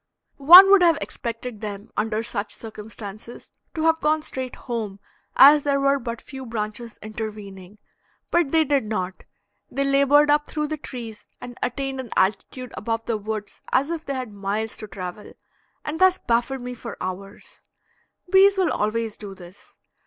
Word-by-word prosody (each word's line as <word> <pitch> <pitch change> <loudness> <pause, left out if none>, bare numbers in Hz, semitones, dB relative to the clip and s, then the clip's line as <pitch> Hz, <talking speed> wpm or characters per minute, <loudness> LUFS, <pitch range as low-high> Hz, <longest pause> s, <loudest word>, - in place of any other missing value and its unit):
One 355 +7 +10
would 400 -2 +7
have 335 -3 +5
expected 230 -2 -6
them 205 -1 -7
under 220 +1 -1
such 210 -3 -4
circumstances 215 0 -9 0.2
to 315 - -2
have 325 0 +2
gone 305 0 +1
straight 260 -3 -4
home, 220 -5 -5 0.4
as 290 +2 +8
there 280 -1 +1
were 275 0 +2
but 235 -2 -6
few 265 -2 -9
branches 225 0 -5
intervening, 210 -3 -8 0.5
but 340 -5 +2
they 320 -1 +4
did 280 -5 +1
not; 190 -4 -4 0.4
they 275 - -1
labored 280 +2 +4
up 295 0 +2
through 300 -1 -3
the 310 - -3
trees 230 -7 -9
and 245 0 -9
attained 270 +1 -3
an 255 -3 -6
altitude 215 +6 -1
above 225 +1 -3
the 230 - -1
woods 210 0 -6
as 280 +5 +2
if 330 -2 -4
they 275 - -4
had 250 -5 -5
miles 205 +2 -3
to 215 - -8
travel, 185 0 -8 0.5
and 300 +2 -4
thus 375 0 +5
baffled 240 +3 -1
me 250 0 -6
for 235 -1 -8
hours. 195 +3 -8 0.7
Bees 390 +2 +5
will 375 -2 +2
always 215 +1 -2
do 200 -2 -9
this. 180 +1 -16
235 Hz, 165 wpm, -23 LUFS, 210-280 Hz, 0.7 s, One